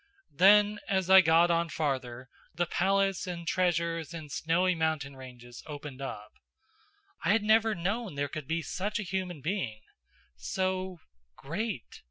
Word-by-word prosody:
Then, 205 Hz, +3 st, +5 dB
as 190 Hz, -2 st, +1 dB
I 190 Hz, 0 st, +10 dB
got 165 Hz, +1 st, +4 dB
on 170 Hz, 0 st, +1 dB
farther, 130 Hz, -5 st, -3 dB, 0.3 s
the 175 Hz, +1 st, +1 dB
palace 195 Hz, +2 st, +1 dB
and 170 Hz, -2 st, -6 dB
treasures 170 Hz, -2 st, 0 dB
and 155 Hz, -3 st, -8 dB
snowy 170 Hz, +6 st, +1 dB
mountain 160 Hz, -4 st, -1 dB
ranges 125 Hz, -2 st, -11 dB
opened 145 Hz, -3 st, -8 dB
up. 105 Hz, -6 st, -6 dB, 0.9 s
I -, -, 0 dB
had 220 Hz, -1 st, +2 dB
never 220 Hz, 0 st, +3 dB
known 195 Hz, +1 st, -2 dB
there 145 Hz, 0 st, -1 dB
could 150 Hz, -1 st, -7 dB
be 165 Hz, +1 st, -1 dB
such 200 Hz, +8 st, -3 dB
a 210 Hz, -, -2 dB
human 180 Hz, -4 st, -4 dB
being. 130 Hz, -, -3 dB, 0.5 s
So 185 Hz, -, -2 dB, 0.4 s
great. 175 Hz, -, -5 dB
170 Hz, 145 wpm, -29 LUFS, 145-190 Hz, 0.9 s, I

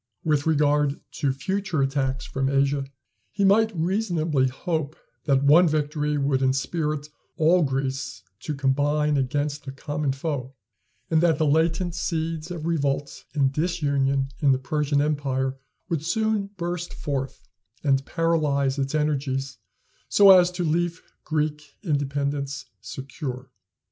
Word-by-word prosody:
With 150 Hz, -1 st, +1 dB
regard 150 Hz, -2 st, +2 dB, 0.2 s
to 140 Hz, -4 st, +2 dB
future 185 Hz, +3 st, -1 dB
attacks 135 Hz, -1 st, -1 dB
from 135 Hz, 0 st, -1 dB
Asia, 140 Hz, 0 st, +1 dB, 0.4 s
he 200 Hz, -1 st, +1 dB
might 220 Hz, +3 st, +4 dB
reasonably 170 Hz, -6 st, +1 dB
hope 155 Hz, +3 st, -3 dB, 0.3 s
that 140 Hz, -2 st, +3 dB
one 160 Hz, +5 st, +6 dB
victory 150 Hz, -1 st, 0 dB
would 140 Hz, -1 st, +1 dB
inspirit 150 Hz, +3 st, -1 dB, 0.3 s
all 170 Hz, +3 st, +4 dB
Greece 135 Hz, -2 st, -2 dB, 0.2 s
to 150 Hz, -, -4 dB
combine 145 Hz, +2 st, +1 dB
against 145 Hz, +2 st, -1 dB
the 135 Hz, -, -6 dB
common 145 Hz, +1 st, -2 dB
foe; 135 Hz, -2 st, -4 dB, 0.6 s
and 160 Hz, -1 st, +4 dB
that 170 Hz, -2 st, +3 dB
the 155 Hz, -, +2 dB
latent 165 Hz, +4 st, +2 dB
seeds 165 Hz, -1 st, -2 dB
of 170 Hz, -3 st, -5 dB
revolt 145 Hz, -4 st, -1 dB
and 135 Hz, -2 st, +2 dB
disunion 140 Hz, -5 st, 0 dB
in 140 Hz, -3 st, +4 dB
the -, -, +2 dB
Persian 145 Hz, +2 st, 0 dB
empire 135 Hz, -3 st, -1 dB, 0.3 s
would 160 Hz, -3 st, -2 dB
soon 215 Hz, +3 st, 0 dB
burst 175 Hz, 0 st, -4 dB
forth 135 Hz, -2 st, -4 dB, 0.4 s
and 135 Hz, -2 st, +2 dB
paralyze 145 Hz, -5 st, +1 dB
its 135 Hz, +2 st, -1 dB
energies, 135 Hz, -3 st, -1 dB, 0.5 s
so 200 Hz, -1 st, +7 dB
as 180 Hz, -2 st, +7 dB
to 180 Hz, 0 st, -2 dB
leave 170 Hz, +1 st, 0 dB, 0.2 s
Greek 150 Hz, -1 st, -2 dB
independence 140 Hz, -3 st, -2 dB
secure. 130 Hz, -, -7 dB
145 Hz, 130 wpm, -25 LUFS, 135-160 Hz, 0.6 s, so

